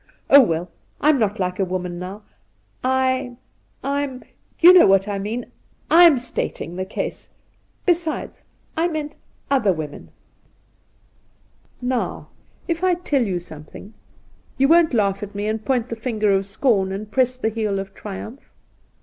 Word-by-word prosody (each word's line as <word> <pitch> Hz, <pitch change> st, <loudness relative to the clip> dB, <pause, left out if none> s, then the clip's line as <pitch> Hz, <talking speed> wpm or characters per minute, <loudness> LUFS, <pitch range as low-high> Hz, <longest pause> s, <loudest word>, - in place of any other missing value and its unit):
Oh, 280 Hz, -, +10 dB
well, 170 Hz, -6 st, -1 dB, 0.3 s
I'm 300 Hz, -2 st, +3 dB
not 210 Hz, -1 st, 0 dB
like 180 Hz, 0 st, -2 dB
a -, -, +3 dB
woman 180 Hz, -1 st, -4 dB
now. 190 Hz, +4 st, -7 dB, 0.6 s
I'm 260 Hz, -1 st, 0 dB, 1.0 s
— -, -, -40 dB
you 350 Hz, +2 st, +9 dB
know 365 Hz, -, +8 dB
what 195 Hz, +1 st, +4 dB
I 200 Hz, -1 st, -2 dB
mean 220 Hz, +5 st, -5 dB, 0.2 s
— -, -, -30 dB
I'm 335 Hz, -6 st, +8 dB
stating 240 Hz, -8 st, -4 dB
the 185 Hz, +1 st, -3 dB
case. 190 Hz, -, -5 dB, 0.6 s
Besides, 340 Hz, -3 st, -1 dB, 0.3 s
I 330 Hz, +2 st, +1 dB
meant 305 Hz, -3 st, -5 dB, 0.3 s
other 255 Hz, -8 st, +3 dB
women.' 155 Hz, -4 st, -6 dB, 0.9 s
' -, -, -38 dB
Now, 245 Hz, -, -3 dB, 0.4 s
if 335 Hz, +1 st, -2 dB
I 365 Hz, -1 st, +3 dB
tell 300 Hz, -6 st, 0 dB
you 190 Hz, -6 st, -1 dB
something, 165 Hz, +5 st, -12 dB, 0.6 s
you 275 Hz, -, +4 dB
won't 325 Hz, -3 st, +4 dB
laugh 200 Hz, -3 st, +1 dB
at 205 Hz, -1 st, -7 dB
me 205 Hz, +1 st, -3 dB
and 215 Hz, 0 st, -2 dB
point 250 Hz, -2 st, 0 dB
the 230 Hz, -, -3 dB
finger 220 Hz, -3 st, 0 dB
of 195 Hz, 0 st, +1 dB
scorn 200 Hz, -3 st, +1 dB
and 205 Hz, +2 st, -6 dB
press 255 Hz, 0 st, +1 dB
the 225 Hz, -, 0 dB
heel 215 Hz, -3 st, -2 dB
of 195 Hz, 0 st, -6 dB
triumph 215 Hz, +6 st, -9 dB
220 Hz, 155 wpm, -22 LUFS, 195-265 Hz, 1.0 s, Oh